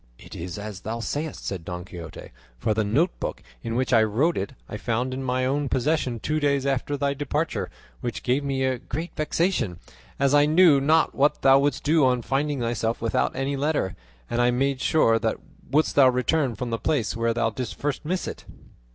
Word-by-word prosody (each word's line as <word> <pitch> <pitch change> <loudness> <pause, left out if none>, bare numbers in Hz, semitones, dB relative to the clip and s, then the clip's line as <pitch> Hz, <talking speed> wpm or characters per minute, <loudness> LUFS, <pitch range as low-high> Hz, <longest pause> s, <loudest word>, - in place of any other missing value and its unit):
"It - - -13
is 85 +2 -6
as 105 -2 -6
thou 110 +4 -4
sayest," 145 +6 -4
said 95 -4 -4
Don 90 +1 -6
Quixote, 85 -4 -9 0.3
"for 85 - 0
the 110 +1 +1
note 140 - +2
book - - -4 0.2
in 115 - -4
which 130 +1 0
I 115 - +6
wrote 120 +11 +2
it 140 - -3
I - - -7
found 120 +4 -1
in 130 - -4
my 130 0 0
own 140 +1 0
possession 130 -3 0
two 155 +7 -1
days 140 -2 +1
after 140 +1 -1
thy 140 0 0
departure, 145 +3 -2 0.3
which 120 -1 -4
gave 130 +3 +1
me 135 -1 -1
very 130 -1 0
great 165 +8 -5
vexation, 155 - 0 0.4
as 140 0 +3
I 145 0 +5
knew 155 -3 +6
not 155 +3 +3
what 145 +2 +1
thou 135 0 +7
wouldst 145 +1 0
do 155 0 +3
on 125 -2 +2
finding 140 +1 -1
thyself 115 -1 -1
without 115 -1 0
any 135 +2 -1
letter; 140 - -1 0.3
and 120 0 0
I 120 - +4
made 130 +2 0
sure 115 -8 +3
thou - - 0 0.3
wouldst 155 +3 +2
return 130 0 +3
from 120 +3 -4
the 115 - -1
place 120 0 0
where 115 0 +1
thou 115 -1 +1
didst 125 +1 -5
first 145 -1 -3
miss 180 +4 -2
it." - - -7
130 Hz, 205 wpm, -25 LUFS, 115-145 Hz, 0.4 s, thou